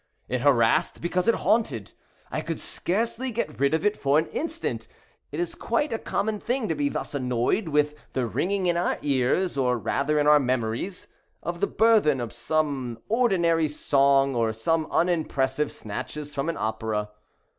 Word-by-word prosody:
It 125 -1 -2
harassed 120 -5 +3
because 180 +3 -1
it 230 - +5
haunted. 140 - 0 0.4
I - - -2
could - - -4
scarcely 230 +7 -1
get 220 -10 -3
rid 140 +3 +3
of 160 - -2
it 210 0 +3
for 140 +1 +2
an 160 - +2
instant. 330 +2 -3 0.4
It - - -4
is 350 - -1
quite 300 -5 -1
a 225 - -2
common 210 +1 -2
thing 245 0 -1
to - - +2
be 145 -2 0
thus - - -4
annoyed 125 - 0
with 150 -1 +2 0.2
the 130 -2 0
ringing 190 - -1
in 175 -1 +2
our 175 - 0
ears, 140 +5 +1
or 125 -2 +2
rather 140 +6 0
in 145 - +2
our 150 0 +7
memories, 130 - -2 0.4
of 170 0 -4
the - - +2
burthen 215 - +3
of 120 -2 -4
some 130 -1 -1
ordinary 175 -9 +2
song, 140 -2 +3
or 115 -2 +1
some 155 +8 0
unimpressive 150 -5 0
snatches 145 +8 -6
from 140 +3 -2
an 165 - -2
opera. 110 -1 -2
150 Hz, 170 wpm, -26 LUFS, 130-180 Hz, 0.4 s, our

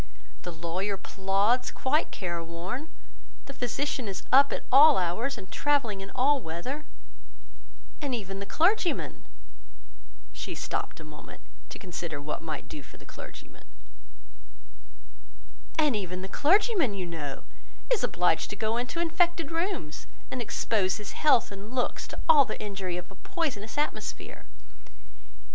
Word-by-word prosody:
The 175 - -5
lawyer 175 +5 -2
plods, 195 +6 +1
quite 295 +4 +1
care 170 -3 -3
worn; 180 - -5 0.6
the 275 - -8
physician 255 0 -1
is 195 -2 -4
up 280 +1 +8
at - - -3
all 290 +3 +9
hours, 220 +10 0
and 190 -3 -10
travelling 260 -9 +1
in 195 - -7
all 275 +2 +4
weather; 225 - -4 1.1
and 280 -4 0
even 195 -3 -5
the 200 - -5
clergyman—" 355 +1 +2 1.1
she - - -5
stopt - - -3
a - - -8
moment 150 -1 -11 0.3
to - - -7
consider 170 -4 -5
what 145 +1 -4
might 155 -3 -5
do 150 - -7
for - - -15
the - - -15
clergyman;—"and - - -8
even 185 -2 -3
the - - -3
clergyman, 340 - +3
you 185 -2 -2
know 155 -5 -5 0.5
is 455 - +1
obliged 175 -1 +2
to - - -4
go 220 +2 0
into 250 +7 -2
infected 340 -1 +2
rooms, 330 - -2 0.2
and 255 - -2
expose 210 -4 +1
his 210 -2 -6
health 290 -9 +4
and 200 +5 -8
looks 250 - 0
to - - -7
all 300 -3 +8
the 225 - -5
injury 195 -4 -3
of 180 +2 -7
a - - -11
poisonous 250 - -3
atmosphere. 290 -8 -3
205 Hz, 140 wpm, -29 LUFS, 175-280 Hz, 1.1 s, all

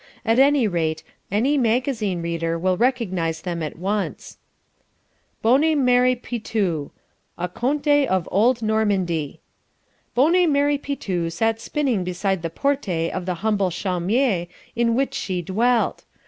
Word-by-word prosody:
At 225 +2 +3
any 275 -3 +4
rate, 160 -4 -1 0.3
any 260 +8 +2
magazine 230 -6 0
reader 165 0 -2
will 185 +2 +1
recognize 185 -9 0
them 175 -2 -3
at 155 0 -5
once: 195 +3 -3 1.0
BONNE 280 +8 +4
MERE 250 0 +4
PITOU 210 - -2 0.5
A 180 - -2
Conte 285 - +1
of 185 -3 0
Old 230 +4 +2
Normandy 195 -8 0 0.7
Bonne 330 +6 +4
Mere 285 0 +2
Pitou 190 -13 -3
sat 225 +6 -1
spinning 260 -11 -1
beside 180 +1 -1
the 165 - -3
porte 180 - -1
of 185 -1 -4
the 180 - -1
humble 205 -3 +2
chaumiere 185 +3 0 0.3
in 230 -1 +2
which 270 +2 0
she 180 -3 -3
dwelt. 230 +7 +1
215 Hz, 130 wpm, -22 LUFS, 175-255 Hz, 1.0 s, any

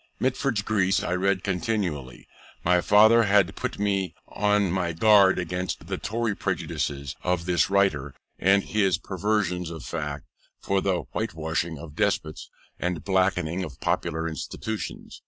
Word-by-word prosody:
Mitford's 130 -4 0
Greece 100 -3 +1
I - - -1
read 95 +1 +1
continually; 90 - -2 0.4
my 90 +1 +3
father 110 +4 +6
had 100 -1 +3
put 125 - -4
me 100 -2 -1
on 105 -2 +1
my 90 -2 -1
guard 100 +1 +5
against 90 +1 -3
the - - -4
Tory 115 -1 -1
prejudices 70 -6 -3
of 90 -2 -1
this 90 0 +2
writer, 85 -9 +1 0.2
and 100 +2 +4
his 95 -5 +1
perversions 95 -2 -1
of 80 -5 -8
facts 75 -3 -4 0.3
for 95 0 0
the 95 -3 0
whitewashing 80 -5 -2
of 75 0 -10
despots, 80 0 -1 0.3
and 90 -3 -2
blackening 95 -2 +1
of 70 -8 -8
popular 80 +2 -1
institutions. 105 +6 -6
95 Hz, 140 wpm, -26 LUFS, 85-100 Hz, 0.4 s, father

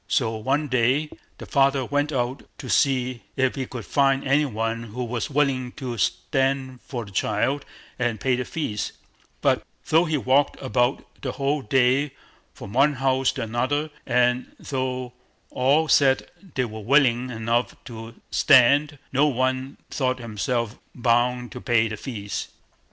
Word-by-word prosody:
So 115 -4 +1
one 135 +7 0
day 130 +4 +1 0.3
the - - -9
father 135 -1 +2
went 145 +3 0
out 125 -1 -1 0.2
to 130 - -8
see 130 -3 +2
if 130 -1 +2
he 130 -2 -4
could 120 -5 -7
find 135 -1 +2
any 145 +3 +4
one 115 -2 -2
who 120 +3 -5
was 120 -2 -3
willing 135 -3 0
to 130 -5 -5
stand 135 - 0
for 120 -4 -5
the 100 - -12
child 130 +8 0 0.3
and 120 -3 0
pay 130 +4 +2
the 125 - -2
fees; 120 -7 -3 0.5
but - - +2 0.3
though 165 +3 +5
he 155 -2 0
walked 135 +2 +2
about 130 0 0 0.2
the 130 - -3
whole 140 +1 0
day 130 +4 +2 0.4
from 100 - -10
one 140 +4 +4
house 135 -1 +1
to - - -3
another, 130 +7 -1 0.2
and 125 0 +1
though 130 -2 -3 0.4
all 140 +5 +3
said 135 -3 +3 0.2
they 130 - +1
were 110 -1 -7
willing 125 +1 +3
enough 115 +1 -1
to 115 -1 -9 0.2
stand, 145 +2 +5 0.2
no 140 +3 +4
one 130 0 -1
thought 130 -2 0
himself 115 0 -2 0.2
bound 125 0 +1
to 125 - -8
pay 120 -3 +2
the 110 - -4
fees. 105 -4 -5
130 Hz, 155 wpm, -24 LUFS, 120-135 Hz, 0.5 s, though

